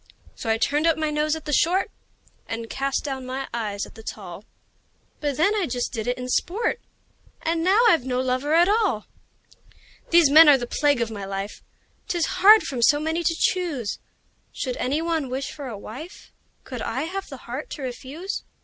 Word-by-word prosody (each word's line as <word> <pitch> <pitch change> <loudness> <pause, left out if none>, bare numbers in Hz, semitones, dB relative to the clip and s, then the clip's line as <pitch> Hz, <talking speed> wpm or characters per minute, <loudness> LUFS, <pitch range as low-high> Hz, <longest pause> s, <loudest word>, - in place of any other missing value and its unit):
So 225 - -6
I 225 - +3
turned 295 +7 +1
up 325 - +3
my 310 -1 -1
nose 300 +1 +1
at 320 - -9
the 295 - -2
short, 360 +7 +2 0.6
And 225 0 -5
cast 275 0 -1
down 270 -3 -4
my 260 +1 -4
eyes 210 -4 -3
at - - -15
the 225 - -12
tall; 200 -3 -8 0.7
But 290 -3 -2
then 335 +7 +3
I 405 -5 0
just 245 0 -2
did 225 -2 -3
it 245 - 0
in 250 0 -5
sport 405 - 0 0.6
And 330 0 0
now 385 +5 +4
I've 335 - +4
no 250 -1 -1
lover 260 +4 0
at 345 +2 +5
all! 405 - +1 1.0
These 335 -4 +6
men 315 +1 +9
are 285 - +7
the 245 - -4
plague 285 +1 +1
of 230 -1 -1
my 205 -2 -6
life: 195 +1 -5 0.5
'Tis 345 -2 0 0.2
hard 425 +1 +8
from 255 -3 -4
so 290 +5 +5
many 320 +2 -1
to 330 0 +1
choose! 320 - -1 0.5
Should 255 -2 -3
any 285 +6 -1
one 325 -5 -1
wish 265 +2 -3
for 285 -3 -7
a 225 -4 -6
wife, 275 - -10 0.3
Could 250 -3 -7
I 265 +5 -2
have 385 +4 -5
the 270 - -8
heart 255 +5 -6
to 290 - -7
refuse? 275 +9 -5
280 Hz, 195 wpm, -24 LUFS, 245-330 Hz, 1.0 s, men